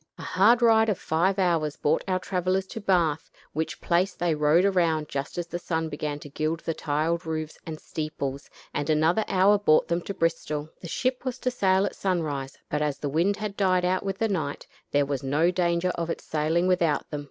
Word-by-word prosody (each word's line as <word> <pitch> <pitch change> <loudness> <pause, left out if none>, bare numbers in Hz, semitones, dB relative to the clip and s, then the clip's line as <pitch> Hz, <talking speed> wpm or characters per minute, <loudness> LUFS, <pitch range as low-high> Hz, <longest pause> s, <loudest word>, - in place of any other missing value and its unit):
A - - -9
hard 230 +6 +4
ride 225 -1 +5
of 200 - 0
five 180 +5 +1
hours 165 -6 +1
brought 150 +2 +1
our 185 -1 +1
travelers 185 +1 -1
to 225 - -7
Bath, 170 -6 +1 0.2
which 160 +2 -3
place 180 +3 +1
they 175 -2 0
rode 150 +4 +3
around 165 -6 +2
just 140 +3 -4
as 175 - -1
the 175 +1 -5
sun 160 -2 -2
began 145 0 -3
to 145 - -9
gild 155 +3 -2
the 165 - -2
tile 155 +2 0
roofs 160 -2 -5
and 155 -1 -5
steeples, 140 -3 -5 0.2
and 145 +1 -2
another 160 +7 +3
hour 195 +2 +4
brought 155 -6 +3
them 170 +1 0
to 200 - -5
Bristol. 160 -3 -1
The 170 - -7
ship 255 +8 -1
was 255 -2 -3
to 255 - -1
sail 190 -5 +2
at - - -4
sunrise, 150 -8 -2
but 150 - -2
as 150 -2 0
the 145 - -3
wind 175 +8 +1
had 210 -2 -4
died 185 -3 +2
out 185 +1 +1
with 195 -1 -3
the 225 - +1
night, 160 -9 -3 0.2
there 145 0 +2
was 140 -2 -2
no 150 +6 +2
danger 175 0 +1
of 170 -2 -3
its - - -4
sailing 160 +3 0
without 175 -4 +1
them. 150 - -3
170 Hz, 210 wpm, -26 LUFS, 155-190 Hz, 0.2 s, ride